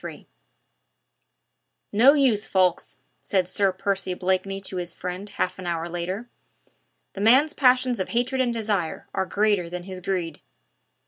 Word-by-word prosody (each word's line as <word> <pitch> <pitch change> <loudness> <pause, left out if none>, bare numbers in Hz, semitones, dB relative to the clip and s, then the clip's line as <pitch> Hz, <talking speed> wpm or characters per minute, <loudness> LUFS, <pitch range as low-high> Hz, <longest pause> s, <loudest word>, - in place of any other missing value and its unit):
III - - -9 1.7
"No 245 +7 +7
use, 255 -8 +2
Ffoulkes," 185 -2 +1 0.3
said 185 -3 0
Sir 195 +1 +2
Percy 195 -1 -2
Blakeney 190 +1 -1
to 190 -1 -6
his 175 -1 -3
friend 180 +3 -6
half 185 -2 -3
an 180 - -6
hour 170 -1 -2
later, 180 +6 -4 0.9
"the 195 - -6
man's 260 +8 +5
passions 255 -3 +3
of 185 - -2
hatred 250 +2 0
and 245 -2 +1
desire 210 -7 -2
are 190 -1 -1
greater 205 -4 +1
than 180 0 -6
his 185 0 -7
greed." 175 -4 -3
195 Hz, 145 wpm, -24 LUFS, 180-225 Hz, 1.7 s, No